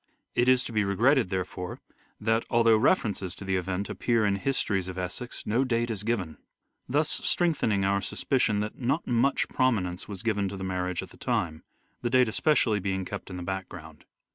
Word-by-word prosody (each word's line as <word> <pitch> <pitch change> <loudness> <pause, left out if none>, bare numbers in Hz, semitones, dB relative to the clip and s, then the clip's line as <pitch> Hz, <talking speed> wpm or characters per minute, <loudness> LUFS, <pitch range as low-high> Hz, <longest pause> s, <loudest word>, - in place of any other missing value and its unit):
It 120 +1 +3
is 130 -1 +5
to - - -6
be 105 -1 +2
regretted, 115 +4 +3
therefore, 90 -1 -4 0.4
that 110 +1 +1
although 115 -1 +5
references 110 - +1
to 95 - -9
the 95 0 0
event 95 +2 -2
appear 115 -3 +1
in 100 -1 +2
histories 100 -6 0
of 95 0 -6
Essex, 95 +7 -5
no 115 +5 +2
date 120 -2 0
is 105 -3 -3
given; 105 -8 -2 0.5
thus 145 +4 +2
strength 170 0 +1
ening 100 -3 +2
our 100 0 +2
suspicion 110 -5 +1
that 105 +1 -5
not 135 +6 0
much 125 +3 +2
prominence 100 -9 0
was 100 0 -7
given 105 -4 0
to 100 - -6
the 95 - -6
marriage 90 -1 -2
at - - -11
the - - -16
time: 80 -3 -2 0.4
the 120 - -1
date 130 0 +4
especially 115 -3 +2
being 95 -1 -2
kept 100 +2 -6
in 90 - -6
the 90 - -5
background. 85 -5 -7
105 Hz, 190 wpm, -28 LUFS, 95-120 Hz, 0.5 s, is